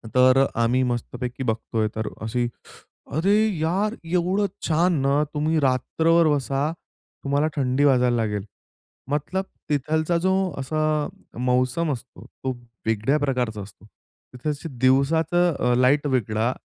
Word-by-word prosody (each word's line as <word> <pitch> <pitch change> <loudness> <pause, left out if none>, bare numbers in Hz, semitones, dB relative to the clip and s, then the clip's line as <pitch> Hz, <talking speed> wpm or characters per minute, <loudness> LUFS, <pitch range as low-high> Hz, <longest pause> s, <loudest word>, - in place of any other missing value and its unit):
तर 130 +1 +6 0.2
आम्ही 120 +3 +2
मस्तपैकी 125 +1 -3
बघतोय 110 -2 -1
तर 110 0 -3
अशी 115 +3 -1 0.7
"अरे 190 +6 +3 0.2
यार! 190 +7 0 0.2
एवढं 180 +3 +1 0.2
छान 170 +3 +3
ना" 140 +2 +2
तुम्ही 155 +2 +1
रात्रभर 160 +5 +2
बसा, 140 +2 -1 0.5
तुम्हाला 145 +2 +1
थंडी 130 0 +1
वाजायला 125 -3 +4
लागेल. 105 -3 -1 0.7
मतलब 150 +6 -1 0.3
तिथलचा 155 +4 +1
जो 190 0 +3 0.3
असा 155 +4 -1 0.6
मौसम 125 +6 +1
असतो, 125 -1 -10
तो 130 - -5 0.4
वेगळ्या 110 +6 +2
प्रकारचा 125 -7 -1
असतो. 100 +1 -13 0.5
तिथे 145 +5 -4
दिवसाचं 160 +7 +3
अ, 125 0 +2
लाईट 140 +4 +3
वेगळा, 115 -2 0
135 Hz, 120 wpm, -24 LUFS, 125-155 Hz, 0.7 s, तर